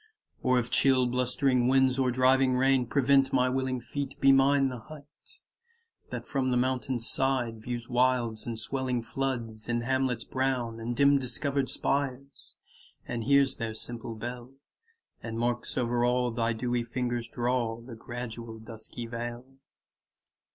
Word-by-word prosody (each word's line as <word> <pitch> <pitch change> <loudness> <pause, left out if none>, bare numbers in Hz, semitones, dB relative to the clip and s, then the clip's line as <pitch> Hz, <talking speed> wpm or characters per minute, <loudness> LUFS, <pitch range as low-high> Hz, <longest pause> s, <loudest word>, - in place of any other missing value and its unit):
Or 130 0 +3
if 120 0 -1
chill 130 -1 +5
blustering 125 0 +1
winds, 130 0 +3
or 130 -1 +2
driving 130 +1 +3
rain, 130 -1 +3
Prevent 135 0 +3
my 130 -1 +3
willing 130 0 -1
feet, 140 +2 -5
be 135 -1 +6
mine 135 0 +4
the 125 -2 -6
hut 150 +4 -12 1.0
That - - -5
from 135 -2 -1
the 125 - +2
mountain's 130 -1 0
side 130 -4 +1
35 - - -14
Views 120 -1 -4
wilds 120 -3 +1
and 115 -1 -3
swelling 125 0 -2
floods, 115 -3 -3
And 120 0 0
hamlets 130 -2 0
brown, 130 -3 -2
and 120 +1 -3
dim 140 +2 +5
discover'd 140 +1 -1
spires, 140 -1 -2 0.5
And 115 -2 -4
hears 140 -1 +3
their 115 -2 -4
simple 115 0 -5
bell, 120 +3 -7 0.7
and 115 0 -5
marks 120 0 -1
o'er 120 -1 +1
all 125 0 +2
Thy 115 0 0
dewy 120 +1 -1
fingers 120 -1 -3
draw 120 -1 -1
The 120 +1 -11
gradual 115 -1 -7
dusky 110 +1 -7
veil. 120 +1 -5
125 Hz, 150 wpm, -29 LUFS, 120-135 Hz, 1.0 s, be